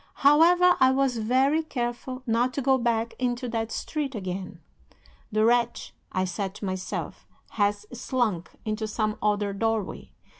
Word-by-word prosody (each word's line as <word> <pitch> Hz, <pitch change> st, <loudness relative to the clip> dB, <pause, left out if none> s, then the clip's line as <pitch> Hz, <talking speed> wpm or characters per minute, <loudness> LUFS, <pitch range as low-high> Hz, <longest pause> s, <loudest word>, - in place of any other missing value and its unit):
However, 350 Hz, +5 st, +6 dB
I 260 Hz, -, +6 dB
was 265 Hz, -2 st, +1 dB
very 260 Hz, +7 st, +2 dB
careful 255 Hz, -2 st, -4 dB
not 240 Hz, +2 st, +1 dB
to 280 Hz, -, -1 dB
go 265 Hz, 0 st, +3 dB
back 230 Hz, -1 st, 0 dB
into 250 Hz, 0 st, -1 dB
that 225 Hz, -1 st, -2 dB
street 290 Hz, -4 st, -3 dB
again. 185 Hz, -2 st, -5 dB, 0.7 s
The 215 Hz, +1 st, +2 dB
wretch, 235 Hz, 0 st, +1 dB, 0.2 s
I 185 Hz, 0 st, 0 dB
said 190 Hz, +1 st, -4 dB
to 210 Hz, -, -6 dB
myself, 185 Hz, -1 st, -4 dB, 0.2 s
has 205 Hz, -1 st, 0 dB
slunk 235 Hz, -8 st, -1 dB, 0.2 s
into 215 Hz, 0 st, -2 dB
some 215 Hz, 0 st, -1 dB
other 205 Hz, -1 st, +1 dB
doorway. 225 Hz, 0 st, -2 dB
230 Hz, 145 wpm, -26 LUFS, 210-260 Hz, 0.7 s, However